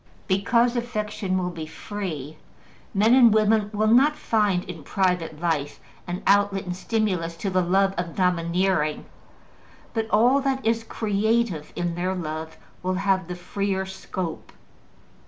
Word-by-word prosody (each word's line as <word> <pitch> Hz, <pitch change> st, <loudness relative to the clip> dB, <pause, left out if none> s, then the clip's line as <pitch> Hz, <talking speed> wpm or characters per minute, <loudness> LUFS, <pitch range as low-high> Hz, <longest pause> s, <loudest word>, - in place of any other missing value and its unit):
Because 235 Hz, +6 st, +2 dB
affection 210 Hz, -5 st, -2 dB
will 180 Hz, -1 st, -1 dB
be 160 Hz, -2 st, -7 dB
free, 160 Hz, -6 st, -6 dB, 0.6 s
men 215 Hz, +4 st, +4 dB
and 245 Hz, -3 st, +7 dB
women 215 Hz, 0 st, +3 dB
will 215 Hz, 0 st, 0 dB
not 260 Hz, +7 st, +5 dB
find 205 Hz, -8 st, +1 dB
in 165 Hz, -3 st, -8 dB
private 180 Hz, -2 st, -1 dB
life 160 Hz, -4 st, -1 dB, 0.3 s
an 175 Hz, +1 st, -4 dB
outlet 200 Hz, -1 st, +3 dB
and 180 Hz, -1 st, -4 dB
stimulus 185 Hz, -5 st, -1 dB
to 195 Hz, +3 st, -3 dB
the 185 Hz, 0 st, +2 dB
love 195 Hz, +2 st, +2 dB
of 175 Hz, -2 st, -4 dB
domineering, 175 Hz, -3 st, +1 dB, 0.9 s
but 225 Hz, -1 st, -2 dB
all 245 Hz, +6 st, +4 dB
that 265 Hz, -2 st, -1 dB
is 225 Hz, 0 st, +1 dB
creative 220 Hz, -5 st, 0 dB
in 175 Hz, -1 st, -1 dB
their 180 Hz, +2 st, -1 dB
love 160 Hz, -2 st, -5 dB, 0.2 s
will 185 Hz, +1 st, -1 dB
have 190 Hz, -2 st, +1 dB
the 180 Hz, -, -5 dB
freer 190 Hz, +2 st, -2 dB
scope. 185 Hz, -3 st, -6 dB
190 Hz, 140 wpm, -24 LUFS, 175-215 Hz, 0.9 s, and